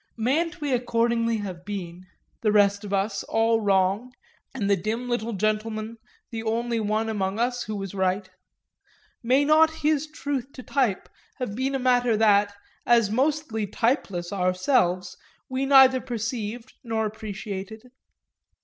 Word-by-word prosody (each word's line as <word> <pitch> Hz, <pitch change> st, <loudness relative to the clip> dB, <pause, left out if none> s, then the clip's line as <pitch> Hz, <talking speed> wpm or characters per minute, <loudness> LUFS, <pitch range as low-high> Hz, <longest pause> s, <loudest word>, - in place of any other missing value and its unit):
Mayn't 320 Hz, +9 st, 0 dB
we 290 Hz, -3 st, -1 dB
accordingly 230 Hz, -1 st, +1 dB
have 180 Hz, -3 st, -7 dB
been, 185 Hz, -2 st, -7 dB, 0.3 s
the 215 Hz, -, +2 dB
rest 200 Hz, 0 st, +3 dB
of 205 Hz, -, -7 dB
us, 200 Hz, 0 st, 0 dB
all 225 Hz, 0 st, +2 dB
wrong, 200 Hz, +4 st, +1 dB, 0.4 s
and 225 Hz, -7 st, -3 dB
the 200 Hz, -, +4 dB
dim 220 Hz, +6 st, -3 dB
little 235 Hz, -1 st, -2 dB
gentleman 215 Hz, +2 st, -2 dB, 0.3 s
the 225 Hz, -1 st, -4 dB
only 230 Hz, +1 st, -1 dB
one 215 Hz, +1 st, 0 dB
among 200 Hz, -2 st, -2 dB
us 245 Hz, +1 st, 0 dB
who 215 Hz, -, -4 dB
was 195 Hz, -2 st, -5 dB
right? 190 Hz, 0 st, 0 dB, 0.9 s
May 260 Hz, +4 st, +3 dB
not 310 Hz, +2 st, +5 dB, 0.2 s
his 305 Hz, 0 st, +2 dB
truth 280 Hz, -3 st, -4 dB
to 255 Hz, -, -9 dB
type 250 Hz, -9 st, 0 dB, 0.3 s
have 250 Hz, -7 st, -4 dB
been 265 Hz, +4 st, -1 dB
a -, -, +2 dB
matter 245 Hz, -3 st, +2 dB
that, 205 Hz, -2 st, +4 dB, 0.3 s
as 230 Hz, -4 st, +3 dB
mostly 260 Hz, -4 st, 0 dB
typeless 200 Hz, -, -1 dB
ourselves, 185 Hz, 0 st, +1 dB, 0.3 s
we 260 Hz, +1 st, -2 dB
neither 265 Hz, -2 st, +7 dB
perceived 230 Hz, 0 st, -4 dB
nor 225 Hz, -2 st, -1 dB
appreciated? 215 Hz, -1 st, -6 dB
225 Hz, 140 wpm, -25 LUFS, 200-250 Hz, 0.9 s, neither